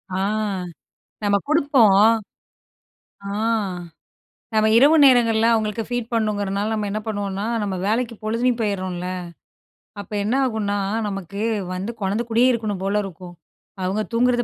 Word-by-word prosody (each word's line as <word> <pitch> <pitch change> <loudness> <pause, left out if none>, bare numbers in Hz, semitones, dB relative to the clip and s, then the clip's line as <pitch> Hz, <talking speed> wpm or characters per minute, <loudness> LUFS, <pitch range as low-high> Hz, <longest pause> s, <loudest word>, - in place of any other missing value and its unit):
ஆ - - -1 1.1
நம்ம 205 -1 +2
குடுப்போம். 280 -10 +4 1.3
ஆ - - -4 1.3
நம்ம 215 0 +3
இரவு 290 +6 +6
நேரங்கள்ல 230 -4 +5
அவுங்களுக்கு 220 0 -1
ஃபீட் 245 -1 -3
பண்ணணுங்கிறனால 210 -2 -1
நம்ம 210 -1 -2
என்ன 215 +2 -2
பண்ணுவோன்னா 200 -2 -3 0.2
நம்ம 200 -2 -2
வேலைக்கு 230 +2 0
பொழுதுலயும் 230 +3 0
போயிர்றோம்ல! 185 -4 -2 0.9
அப்ப 200 - -9
என்னாகுன்னா 220 -3 0 0.3
நமக்கு, 195 -1 -6 0.3
வந்து 190 +5 -4
கொழந்தக் 210 +5 -1
கூடயே 235 +3 +4
இருக்கணும் 215 -5 -2
போல 200 +2 +1
இருக்கும். 180 -2 -9 0.5
அவுங்க 190 +4 0
தூங்குறத 245 +1 +2
215 Hz, 115 wpm, -22 LUFS, 200-235 Hz, 1.3 s, இரவு